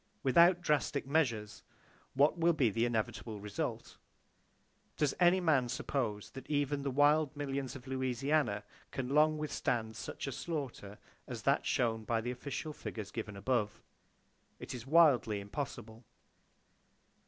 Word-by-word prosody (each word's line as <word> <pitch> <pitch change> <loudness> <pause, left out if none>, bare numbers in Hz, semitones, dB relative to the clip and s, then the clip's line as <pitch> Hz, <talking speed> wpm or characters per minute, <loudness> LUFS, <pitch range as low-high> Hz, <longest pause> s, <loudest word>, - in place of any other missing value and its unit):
Without 170 +6 +5
drastic 150 -5 +1
measures, 125 -8 0 0.5
what 140 +3 +4
will 170 0 +3
be 135 -8 +2
the 115 +3 +1
inevitable 110 -1 -2
result? 105 0 -4 1.0
Does 150 -3 +2
any 180 +1 +5
man 145 -8 +2
suppose 120 -4 -2
that 135 - -10
even 145 -1 0
the 140 - -2
wild 145 +2 +3
millions 140 -2 -3
of 130 -2 -10
Louisiana 130 -3 0 0.3
can 130 -2 -4
long 155 +2 +4
withstand 120 -7 -2
such - - -7
slaughter 135 -11 -5 0.3
as - - -6
that - - +2
shown 115 -3 +1
by 115 +1 0
the 120 +2 -3
official 140 +4 -5
figures 105 -7 -7
given 110 -3 -5
above? 105 -1 -1 0.8
It - - -7
is 125 0 -7
wildly 140 -9 +5
impossible. 115 +1 -6
130 Hz, 130 wpm, -33 LUFS, 115-150 Hz, 1.0 s, Without